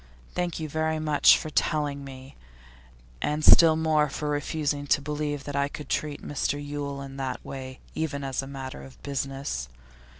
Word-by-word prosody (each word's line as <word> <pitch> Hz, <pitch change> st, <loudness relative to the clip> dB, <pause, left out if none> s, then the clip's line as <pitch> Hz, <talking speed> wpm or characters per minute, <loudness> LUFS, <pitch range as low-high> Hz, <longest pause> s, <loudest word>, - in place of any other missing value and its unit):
Thank 175 Hz, -2 st, -1 dB
you 160 Hz, -, -3 dB
very 160 Hz, +1 st, 0 dB
much 155 Hz, -2 st, +6 dB
for 155 Hz, -, -6 dB
telling 145 Hz, -3 st, 0 dB
me, 135 Hz, 0 st, -10 dB, 0.9 s
and 150 Hz, +1 st, 0 dB
still 165 Hz, -2 st, +9 dB
more 155 Hz, -2 st, +2 dB
for 150 Hz, +2 st, -3 dB
refusing 145 Hz, 0 st, -1 dB
to -, -, +4 dB
believe 145 Hz, 0 st, -3 dB
that 145 Hz, -, -5 dB
I 140 Hz, 0 st, +2 dB
could 145 Hz, +1 st, -8 dB
treat 150 Hz, -1 st, -2 dB
Mr 145 Hz, 0 st, 0 dB
Yule 145 Hz, -1 st, -4 dB
in 135 Hz, 0 st, -9 dB
that 135 Hz, -2 st, -4 dB
way, 130 Hz, -1 st, -7 dB
even 145 Hz, -3 st, -2 dB
as 135 Hz, -1 st, -1 dB
a 135 Hz, -, -8 dB
matter 135 Hz, -, -6 dB
of 65 Hz, -2 st, -13 dB
business. 135 Hz, -, -3 dB
145 Hz, 170 wpm, -27 LUFS, 135-150 Hz, 0.9 s, still